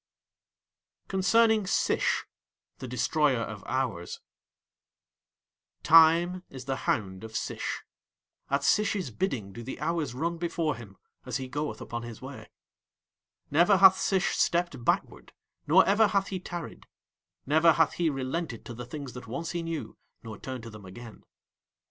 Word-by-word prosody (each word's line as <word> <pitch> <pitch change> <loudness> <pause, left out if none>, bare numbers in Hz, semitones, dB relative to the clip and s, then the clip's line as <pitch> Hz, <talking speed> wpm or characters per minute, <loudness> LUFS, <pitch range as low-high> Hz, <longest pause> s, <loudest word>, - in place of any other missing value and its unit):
CONCERNING 215 +2 +3
SISH - - +1 0.5
(The 130 - -6
Destroyer 130 +2 +1
of 110 -3 -6
Hours) 125 -10 -2 1.6
Time 165 +3 +6
is 130 -1 -9
the 135 -1 -1
hound 95 -3 -1
of 110 0 -9
Sish. - - -3 0.7
At 140 +1 0
Sish's 200 - +1
bidding 115 - -3
do 120 - -8
the 125 +2 -7
hours 155 -4 -2
run 165 +5 -2
before 165 -3 -1
him 105 -5 -12 0.3
as 125 -2 -3
he 130 -1 -5
goeth 145 +3 -4
upon 120 0 -5
his 120 -2 -8
way. - - -10 1.0
Never 175 +7 +5
hath 190 0 +7
Sish 190 -1 +1
stepped 170 -7 0
backward - - -1 0.3
nor 175 +6 +6
ever 210 +2 +4
hath 200 -1 0
he 190 - -3
tarried; 175 -2 -7 0.6
never 160 +3 +5
hath 160 0 +3
he 170 -2 +1
relented 135 -1 -4
to 120 - -7
the 120 +1 -8
things 140 -1 -7
that 125 -1 -9
once 150 +8 -4
he 175 - -2
knew 165 -1 -5 0.2
nor 110 -3 -8
turned 130 -3 -6
to 115 - -9
them 105 -2 -12
again. 115 +4 -11
145 Hz, 145 wpm, -28 LUFS, 120-175 Hz, 1.6 s, hath